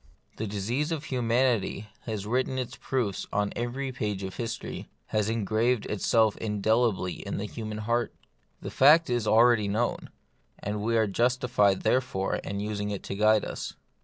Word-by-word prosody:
The 110 - -3
disease 115 - -2
of 155 -3 -2
humanity 120 -5 +1 0.2
has 105 -3 -3
writ 125 +4 +1
ten 130 - -4
its 125 -1 -3
proofs 120 -7 -2
on 105 0 0
every 130 +3 -3
page 105 -6 -3
of 95 -1 -6
history, 115 -1 -5 0.2
has 105 0 +1
engraved 115 +2 +1
itself 110 +1 +2
indelibly 105 -2 0
on - - -3
the 100 - -3
human 110 0 -6
heart. 115 +2 0 0.5
The - - -6
fact 150 +2 +6
is 120 -3 0
already 115 -1 +5
known, 110 +4 -1 0.5
and 105 +1 -4
we 115 +2 +1
are 110 - +4
jus 120 +5 +1
tified 110 -7 +2
therefore 120 -7 +1
in 100 - -5
using 105 0 -3
it 100 -1 -4
to - - -5
guide 110 +1 +4
us. - - -5
110 Hz, 165 wpm, -28 LUFS, 105-125 Hz, 0.5 s, fact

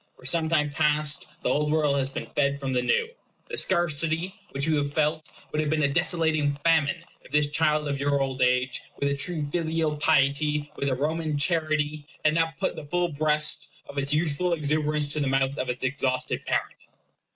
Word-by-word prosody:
For - - -16
some 165 -2 +2
time 150 -3 +2
past 150 0 +1 0.2
the - - +1
Old 150 +1 +1
World 150 -2 +2
has 135 0 -1
been - - -5
fed 140 -1 +1
from 135 -1 -3
the 125 - +2
New. 455 - +1 0.4
The - - -4
scarcity 165 0 0 0.2
which 140 +1 -2
you 160 -1 +2
have 145 -1 -1
felt 155 +1 0 0.2
would 150 - 0
have 155 - -1
been 155 0 +1
a - - +4
desolating 155 -4 +1
famine, 165 0 +2 0.2
if - - -17
this 150 -1 +2
child 150 -1 +1
of 140 -1 -2
your 140 0 +1
old 135 -1 -2
age, 125 +1 +2 0.2
with 140 - 0
a 140 - 0
true 155 +2 0
filial 160 -2 0
piety, 150 0 +2
with 140 - -1
a 130 - 0
Roman 155 +2 -1
charity, 155 -1 +1 0.2
had 155 - +5
no 165 0 +3
t 160 - -9
put 185 - -1
the 150 - -8
full 175 +3 0
breast 150 +1 +1 0.2
of 140 - -3
its 140 +1 0
youthful 160 +3 +1
exuberance 150 -1 0
to 155 - -1
the 140 - 0
mouth 135 0 +1
of 130 - -2
its 125 +1 -1
exhausted 130 -1 -1
parent. - - -2
150 Hz, 205 wpm, -26 LUFS, 140-160 Hz, 0.4 s, had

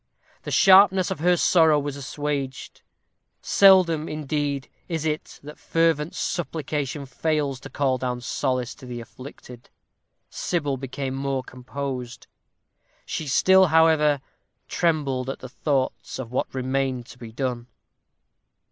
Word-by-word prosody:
The - - -7
sharpness 190 -1 +6
of 190 - -3
her 175 +2 +3
sorrow 160 -3 +4
was 145 -1 -4
assuaged. 140 -1 -4 0.6
Seldom, 180 -5 +4
indeed, 145 -2 -2 0.2
is 160 -2 -3
it 155 0 -3
that 150 +1 -11
fervent 165 -2 +1
supplication 150 -4 -3
fails 145 0 -1
to 135 - -10
call 130 -2 0
down 125 -1 -3
solace 130 -1 -2
to 130 - -13
the 120 -1 -6
afflicted. 125 +1 -12 0.6
Sybil 145 -6 -2
became 135 0 -5
more 135 -1 -2
composed. 130 -1 -6 0.8
She 155 - -4
still, 190 +7 +5
however, 155 -3 +4 0.5
trembled 140 -6 0
at 135 - -4
the 130 - -10
thoughts 135 0 -2
of 125 -3 -7
what 125 - -2
remained 130 -1 -2
to 125 - -14
be 115 -2 -9
done. 120 0 -3
140 Hz, 125 wpm, -24 LUFS, 130-160 Hz, 0.8 s, sharpness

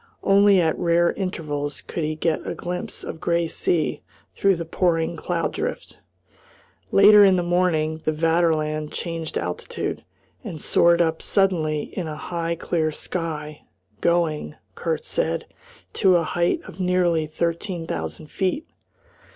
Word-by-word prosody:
Only 200 0 +5
at 160 -2 +2
rare 170 0 +3
intervals 150 -6 -3
could 170 - -4
he 155 0 -1
get 160 +1 -1
a - - -3
glimpse 180 0 -4
of - - -6
grey 170 0 +1
sea 160 0 0 0.3
through 195 -1 +3
the 170 -1 -5
pouring 165 -1 0
cloud 165 0 -2
drift. - - -4 0.9
Later 205 +1 +8
in 190 -2 +6
the 175 - +1
morning 165 -3 +1
the 155 - +1
Vaterland 155 -1 +1
changed 165 -2 -4
altitude, 90 +1 -4 0.4
and 160 - -6
soared 170 +3 +4
up 160 -1 -1
suddenly 160 -7 +1
in 180 -4 -3
a 155 - -5
high, 170 +1 -3
clear 160 -1 -1
sky, 155 -2 -4 0.4
going, 165 -3 0 0.2
Kurt 160 -2 -3
said, 165 0 -1 0.5
to 190 -3 +4
a 170 - +3
height 170 +2 0
of - - -12
nearly 180 -3 +2
thirteen 170 +2 -2
thousand 85 - -5
feet. 195 - -1
170 Hz, 140 wpm, -23 LUFS, 155-180 Hz, 0.9 s, Later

